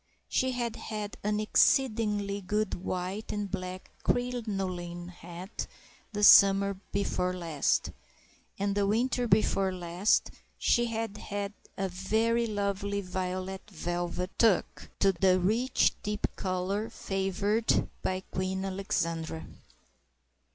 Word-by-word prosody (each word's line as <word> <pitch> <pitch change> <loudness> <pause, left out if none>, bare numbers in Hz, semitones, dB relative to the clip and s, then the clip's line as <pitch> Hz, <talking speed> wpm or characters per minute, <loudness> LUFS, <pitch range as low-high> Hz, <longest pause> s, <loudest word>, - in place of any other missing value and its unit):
She 260 0 +1
had 240 -2 -2
had 210 -2 -5
an 210 +1 +1
exceedingly 215 -3 +2
good 210 +3 -1
white 185 +3 -3
and 205 -2 -3
black 185 -1 -5
crinoline 195 -8 -2
hat 175 +3 -7 0.4
the 210 -1 -2
summer 200 -1 +7
before 180 -2 0
last, 165 -5 0 0.7
and 200 0 0
the 200 0 +1
winter 245 +3 +1
before 195 -2 +3
last 180 +2 +1 0.3
she 240 - +3
had 225 -2 -3
had 205 -1 -4 0.2
a 195 - 0
very 220 +6 +1
lovely 200 -1 -1
violet 185 +1 -4
velvet 175 0 -3
toque—the 190 -3 +2
rich 225 +8 +3
deep 210 0 -1
colour 190 +3 -1
favoured 200 +3 0
by 185 0 -1
Queen 190 0 -3
Alexandra. 165 -4 -2
195 Hz, 105 wpm, -30 LUFS, 185-215 Hz, 0.7 s, summer